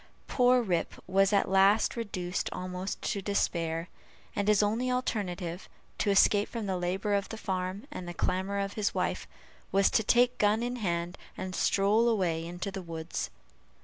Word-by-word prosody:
Poor 250 -1 +3
Rip 175 -6 -1
was 195 +2 +3
at 200 - +3
last 195 +3 +4
reduced 185 -6 -3
almost 185 +1 -4
to 200 - -1
despair; 170 -4 -1 0.5
and 200 0 -1
his 210 -1 +5
only 225 +5 0
alternative, 190 -8 -3 0.3
to - - +1
escape 200 +1 +4
from 230 -3 -4
the 190 -2 -1
labor 185 +3 -1
of 200 0 0
the 225 - -6
farm 190 +2 -3
and 185 -11 -6
the 175 - -5
clamor 190 +4 -1
of 200 0 -2
his 210 -2 -1
wife, - - -1 0.4
was 195 0 +4
to - - +3
take 245 +3 +3
gun 210 +2 +3
in 245 +1 -2
hand, 175 -4 -2 0.2
and 185 0 -5
stroll 210 +5 +3
away 175 -7 0
into 175 +4 -5
the 195 -1 -5
woods. 165 -1 -4
195 Hz, 170 wpm, -30 LUFS, 180-210 Hz, 0.5 s, his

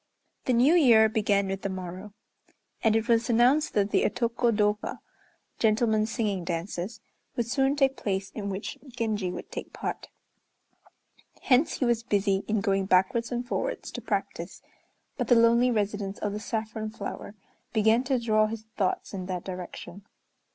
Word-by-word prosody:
The 255 - +2
New 250 +7 +5
Year 235 -10 +6
began 205 -2 +1
with 195 0 -3
the 195 - -2
morrow; 185 +2 -7 0.7
and 220 -2 +4
it 225 +1 +1
was 230 -1 +2
announced 250 +6 +3
that 205 -1 +2
the - - +3
Otoko 235 +1 +1
dôka 210 -1 0 0.6
(gentlemen's 220 -1 +2
singing 205 -6 -1
dances) 175 +5 -4 0.3
would 235 - 0
soon 270 +3 +1
take 270 -2 +2
place 195 -1 -2
in 200 -2 -5
which 195 +1 -5
Genji 220 -6 -2
would - - -7
take - - -7
part. - - -5 1.4
Hence 270 +3 +3
he 260 - -1
was 235 -1 +2
busy 200 -3 +1
in 215 -1 +1
going 195 -1 +1
backwards 230 +6 +2
and 245 0 -3
forwards, - - -3
to - - -6
practise, - - -4 0.5
but - - -1
the 245 - +6
lonely 235 +2 +5
residence 205 -3 -1
of 205 - -2
the 210 - -3
saffron 220 -1 -4
flower 205 -1 -7 0.4
began 220 +2 +3
to 265 -1 +1
draw 215 -2 +2
his 220 0 -6
thoughts 195 0 -1
in 185 -2 -5
that 180 -2 -3
direction. 185 +1 -8
215 Hz, 160 wpm, -27 LUFS, 200-235 Hz, 1.4 s, Year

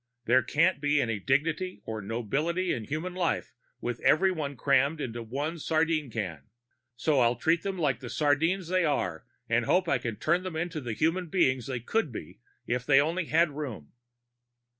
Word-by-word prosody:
_There 125 +3 +5
can't 165 +2 +2
be 145 0 +2
any 115 -5 0
dignity 155 - 0
or 110 -1 -4
nobility 140 - -1
in 110 - -4
human 155 +7 -3
life 180 -2 -1 0.3
with 120 0 -3
everyone 155 -6 +2
crammed 140 +4 +2
into 120 -4 -4
one 145 +9 -4
sardine 155 -2 +1
can. 90 - -5 0.5
So 135 +4 +2
I'll 120 0 +4
treat 165 +5 +2
them 195 -1 -3
like 140 -8 0
the 125 -2 -8
sardines 160 +7 +1
they 185 0 +2
are, 140 - -1 0.2
and 115 0 +1
hope 180 +6 +2
I 170 - +2
can 115 -2 -4
turn 170 +10 +1
them 185 -3 -6
into 165 -1 -3
the 120 -3 -4
human 165 +8 0
beings 130 - +1
they 130 -3 -3
could 220 - 0
be 80 - -8 0.3
if 125 +1 -1
they 135 +1 +5
only 165 +5 0
had 165 +1 +3
room. 130 - -6
145 Hz, 180 wpm, -28 LUFS, 120-170 Hz, 0.5 s, There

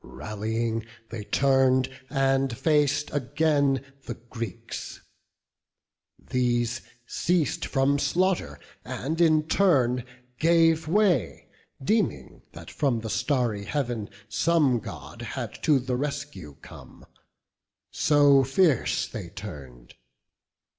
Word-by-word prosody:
Rallying 110 - -3 0.2
they 110 -3 -6
turn'd, 130 -1 +3 0.2
and 135 -1 +1
fac'd 150 -2 +1
again 145 -1 +1 0.2
the 120 - -4
Greeks: 115 -4 -7 1.3
These 120 -1 0 0.2
ceas'd 170 +2 0
from 140 0 +1
slaughter, 185 +4 0 0.2
and 160 +6 -3
in 155 -2 +4
turn 130 -10 +2 0.4
gave 165 -1 +3
way, 175 - +1 0.3
Deeming 170 - -1
that - - -10
from 130 -6 0
the 110 -1 -5
starry 120 -4 0
Heav'n 120 -4 -2 0.2
some 135 +3 +2
God - - -9
Had - - -6
to 150 -3 +4
the 125 -1 -2
rescue 145 - -5
come; - - -13 0.9
so 145 -2 +4
fierce 135 - +2
they - - -7
turn'd. 60 -4 -10
135 Hz, 100 wpm, -26 LUFS, 115-155 Hz, 1.3 s, in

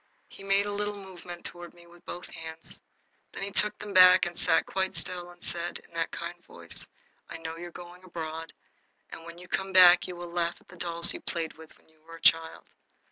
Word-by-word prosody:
He - - -13
made 195 +1 +3
a 205 - -3
little 205 0 -2
movement 180 -3 -10
toward 175 -1 -7
me 170 0 -17
with 170 0 -18
both 175 - -8
hands. 160 0 -5 0.5
Then - - -5
he 200 - -3
took 210 +1 +3
them 210 -1 -7
back 185 0 +8
and 175 0 -5
sat - - +3
quite 190 0 -1
still 175 -1 -2
and 175 0 -15
said, 175 0 -3
in - - -21
that - - -1
kind - - -7
voice: - - -9 0.4
"I - - -6
know 165 0 -6
you 175 +1 -7
are - - -11
going 175 +1 -12
abroad, 165 -2 -6 0.6
and 165 - -9
when 170 0 -10
you 180 +1 -12
come 190 +1 -2
back 180 -1 +8
you 180 - -6
will 175 0 -8
laugh 170 0 -1
at - - -26
the 180 - -13
dolls 170 -1 +3
you - - -7
played 165 -2 -3
with 160 0 -15
when - - -29
you 160 -1 -29
were 165 +1 -12
a 165 - -14
child." 165 -1 +4
175 Hz, 230 wpm, -28 LUFS, 165-185 Hz, 0.6 s, back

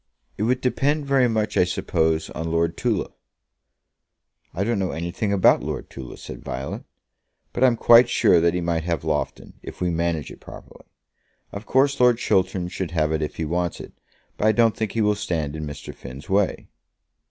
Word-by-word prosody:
"It - - -7
would 125 0 +1
depend 145 +3 0
very 135 -2 +3
much, 105 -1 -1
I - - +6
suppose, 80 -3 0
on 80 +1 -4
Lord 85 0 +1
Tulla." - - -1 1.4
"I 90 +6 -2
don't 115 0 0
know 95 -2 -1
anything 85 +5 -3
about 100 -2 +4
Lord - - -5
Tulla," 65 -2 -9
said - - -9
Violet; 65 +2 -5 0.7
"but - - 0
I'm 125 -2 +5
quite 120 +1 +7
sure 85 - +4
that 85 +1 +2
he 90 - -1
might 85 -1 -1
have 85 -3 -2
Loughton, - - -3
if - - -10
we 90 -1 0
manage 85 -3 -1
it - - -12
properly. - - -13 0.7
Of 100 +2 -8
course 135 +1 +2
Lord 125 -2 +5
Chiltern 95 -4 0
should 90 0 -4
have 80 -2 0
it 80 0 0
if 75 - -3
he 80 - -3
wants 85 +2 -2
it, - - -10 0.4
but 105 - +1
I 110 - +5
don't 115 -1 +3
think 110 -3 -3
he 115 - 0
will 105 0 +3
stand 80 -7 -3
in 75 -1 -5
Mr. 75 0 -8
Finn's 65 +5 -10
way." 100 0 0
90 Hz, 190 wpm, -23 LUFS, 80-110 Hz, 1.4 s, quite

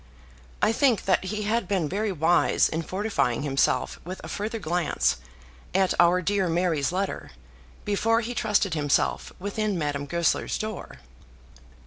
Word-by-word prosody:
I 215 - +5
think 245 -1 +2
that 190 0 +2
he 210 +2 -3
had 215 -1 0
been 185 -5 0
very 205 +6 -1
wise 170 0 +3
in 160 - -2
fortifying 160 - -1
himself 135 -2 +1
with 185 +3 -7
a - - -6
further 220 +3 -3
glance 175 - 0 0.6
at 190 -1 +3
our 175 +1 +5
dear 195 -1 +1
Mary's 165 -4 +1
letter, 190 +2 -3 0.6
before 225 +3 +2
he 240 +1 -4
trusted 210 -5 +1
himself 145 -3 0
within 205 +1 -2
Madame 145 -2 -2
Goesler's 170 +1 0
door. 215 -2 -6
190 Hz, 140 wpm, -26 LUFS, 165-210 Hz, 0.6 s, I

